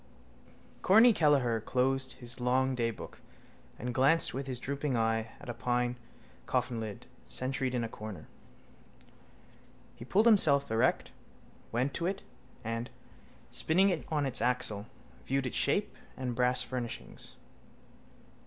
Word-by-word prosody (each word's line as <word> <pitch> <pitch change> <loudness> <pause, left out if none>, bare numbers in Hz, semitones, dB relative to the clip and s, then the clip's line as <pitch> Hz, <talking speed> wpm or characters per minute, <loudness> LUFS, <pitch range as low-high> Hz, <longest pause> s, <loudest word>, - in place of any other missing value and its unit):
_ - - -28
Corny 225 +5 +7
Kelleher 135 - +3
closed 130 +3 0
his 120 +1 -6
long 130 +2 +2
daybook 115 -3 -3 0.6
and 125 +1 -4
glanced 135 +6 +3
with 135 +1 -4
his 130 -2 -3
drooping 140 0 -2
eye 115 0 0
at - - -12
a 120 - -3
pine 120 +1 0 0.5
coffinlid 120 -5 -2 0.2
sentried 130 0 -1
in 120 - 0
a - - -1
corner. 110 -3 -8 1.7
He 120 - -10
pulled 200 - +3
himself 155 - +4
erect, 115 +3 +2 0.6
went 125 +4 0
to 170 - -1
it 195 +1 -3 0.4
and, 115 +1 -3 0.6
spinning 185 +5 +3
it 175 -4 -1
on 150 -2 0
its 130 -2 0
axle, 120 -4 0 0.4
viewed 135 0 0
its 125 - -3
shape - - +1 0.2
and 125 -2 -2
brass 125 +1 +2
furnishings. 120 -1 -6
125 Hz, 130 wpm, -31 LUFS, 120-140 Hz, 1.7 s, Corny